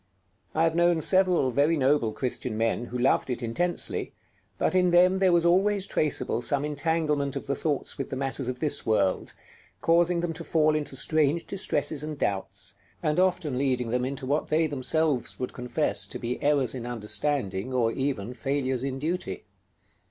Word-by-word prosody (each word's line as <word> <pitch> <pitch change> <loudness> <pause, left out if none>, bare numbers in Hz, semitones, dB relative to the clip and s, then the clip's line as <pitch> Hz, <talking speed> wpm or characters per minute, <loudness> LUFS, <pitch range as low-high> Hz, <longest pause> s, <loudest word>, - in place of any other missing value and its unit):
I 160 - +3
have 165 -1 +2
known 170 0 +3
several 180 -5 +3
very 145 +6 +2
noble 135 -4 +2
Christian 125 -2 -3
men 115 +1 0
who 125 - -5
loved 130 +2 +2
it 125 0 -3
intensely, 175 +10 0 0.4
but - - 0
in 180 -1 +3
them 180 +2 +4
there 190 -1 +4
was 170 -1 +3
always 195 +3 +3
traceable 150 - 0
some 140 +3 +1
entanglement 150 -1 0
of - - -4
the 140 - -1
thoughts 145 -2 -2
with 135 - -3
the - - -4
matters 135 -1 -2
of 125 0 -4
this 150 - -1
world, 100 -4 0 0.4
causing 170 +1 +3
them 170 -1 -2
to 165 +1 -7
fall 155 -1 +2
into 150 -3 -3
strange 155 +3 +1
distresses 150 -6 0
and 150 -1 -5
doubts, 100 -3 -3 0.3
and 155 +1 +1
often 180 -8 +1
leading 130 -3 0
them 125 +1 0
into 135 0 -4
what 145 +4 0
they 160 +1 +2
themselves 145 -1 0
would 125 - -4
confess 125 -1 -1
to - - -6
be 120 +1 -4
errors 140 -5 +2
in 120 -2 -6
understanding, 120 -2 -2
or 120 -3 +1
even 125 -4 -2
failures 130 0 -2
in 135 -1 -2
duty. 150 - -3
140 Hz, 175 wpm, -27 LUFS, 125-165 Hz, 0.4 s, them